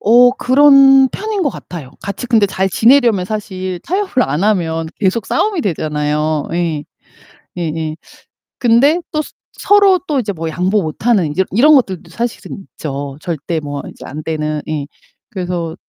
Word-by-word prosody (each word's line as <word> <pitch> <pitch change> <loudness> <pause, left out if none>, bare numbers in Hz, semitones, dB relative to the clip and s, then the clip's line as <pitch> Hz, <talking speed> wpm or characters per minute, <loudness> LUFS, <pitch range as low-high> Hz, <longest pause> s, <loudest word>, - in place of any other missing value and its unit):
어, 245 +3 +6
그런 270 0 +6
편인 420 +5 -3
것 290 - +1
같아요. 165 - -9
같이 200 +5 -5
근데 225 -4 +3
잘 190 0 -1
지내려면 230 -2 +3
사실 185 -3 -5
타협을 375 -5 0
안 150 +7 -1
하면 165 -6 0
계속 200 +2 0
싸움이 410 -5 0
되잖아요. 150 -3 -1
예. 165 -4 -2 0.7
예예. 160 -2 -3 0.6
근데 260 +8 +4
또 305 - 0
서 - - -10 0.3
서로 400 -2 +4
또 290 -3 0
이제 215 -5 -2
뭐 165 -2 -4
양보 185 +6 0
못하는 185 +2 0
이제 185 +6 +1
이런 290 +10 +5
것들도 190 - 0
사실은 235 -4 -5
있죠. 140 -2 -6
절대 165 -1 -3
뭐 145 -2 -6
이제 - - -14
안 155 +3 -7
되는 155 -1 -3
예. 150 -2 -3 0.4
그래서 175 -4 -4
190 Hz, 290 characters per minute, -16 LUFS, 160-250 Hz, 0.7 s, 어